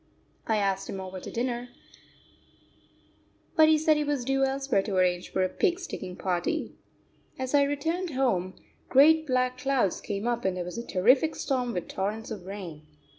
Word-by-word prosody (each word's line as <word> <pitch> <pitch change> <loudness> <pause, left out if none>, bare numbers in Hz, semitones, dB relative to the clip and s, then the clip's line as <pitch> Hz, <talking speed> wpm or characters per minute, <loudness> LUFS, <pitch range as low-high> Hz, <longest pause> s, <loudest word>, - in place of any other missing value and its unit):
I 220 - +2
asked 195 -1 0
him 195 - -4
over 190 0 -6
to - - -8
dinner, 240 0 -3 1.9
but 315 0 +6
he 315 - +5
said 310 0 +3
he 300 - +1
was 290 -4 -1
due 270 +1 +1
elsewhere 270 -5 +1
to 195 0 -4
arrange 180 -1 +1
for 190 - +1
a - - +2
pig 355 - 0
sticking 185 - -6
party. 180 -2 -2 0.6
As 260 +1 -4
I 285 - +6
returned 320 +6 -1
home, 185 -9 0 0.3
great 315 +4 +6
black 255 -1 +1
clouds 260 -8 +1
came 205 +1 -4
up 240 0 -1
and 190 -1 0
there 180 - -3
was 180 +6 -5
a 235 - -7
terrific 255 +12 +3
storm 250 -3 -1
with 180 - -3
torrents 215 +4 -3
of 190 -4 -7
rain. 175 -7 -8
240 Hz, 180 wpm, -28 LUFS, 190-275 Hz, 1.9 s, but